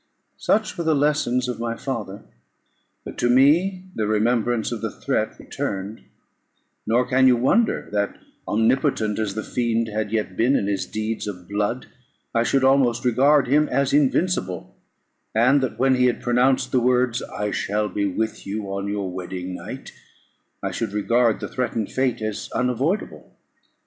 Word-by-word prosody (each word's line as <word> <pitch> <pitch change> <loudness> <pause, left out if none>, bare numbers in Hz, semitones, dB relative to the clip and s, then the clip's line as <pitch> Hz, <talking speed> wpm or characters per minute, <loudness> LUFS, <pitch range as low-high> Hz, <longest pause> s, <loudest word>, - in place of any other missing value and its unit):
Such 215 -4 0
were - - 0
the 160 -1 +2
lessons 140 -4 +1
of 125 -2 -4
my 115 0 -2
father. 115 -7 -5 0.8
But - - -9
to 120 - +2
me 165 +9 +4
the 110 -2 -1
remembrance 115 +2 +1
of 115 -3 -4
the 110 - -2
threat - - -2
returned: 100 +3 -5 0.9
nor 120 +3 +3
can 130 0 +4
you 125 - +6
wonder, 215 - +2
that, 100 -1 -1 0.3
omnipotent 110 -1 +1
as 105 -3 -2
the 110 - -3
fiend 115 -2 -1
had 105 -1 -3
yet 105 -4 -2
been 125 +7 +3
in 100 - +1
his 100 -1 -2
deeds 110 0 -3
of 90 -3 -7
blood, 105 +5 -2 0.5
I 115 - +2
should 135 +3 +1
almost 130 -3 +3
regard 135 +3 +4
him 150 +4 +3
as 140 +1 +1
invincible; 140 - 0 0.6
and 125 +5 +4
that 130 - -2
when 135 +1 +3
he 125 0 +3
had 120 - 0
pronounced 125 +1 +2
the 130 - +3
words, 125 0 +2
"I 105 0 -4
shall 105 +2 -1
be 100 -1 -1
with 110 +3 -3
you 100 -1 -4
on 100 0 -3
your 100 -1 -2
wedding 90 0 -5
night," - - -8 0.7
I - - -1
should 100 - -3
regard 115 +2 +2
the - - -4
threatened 120 -4 -2
fate 130 -4 0
as 110 -1 -4
unavoidable. 130 - -2
120 Hz, 165 wpm, -23 LUFS, 105-130 Hz, 0.9 s, you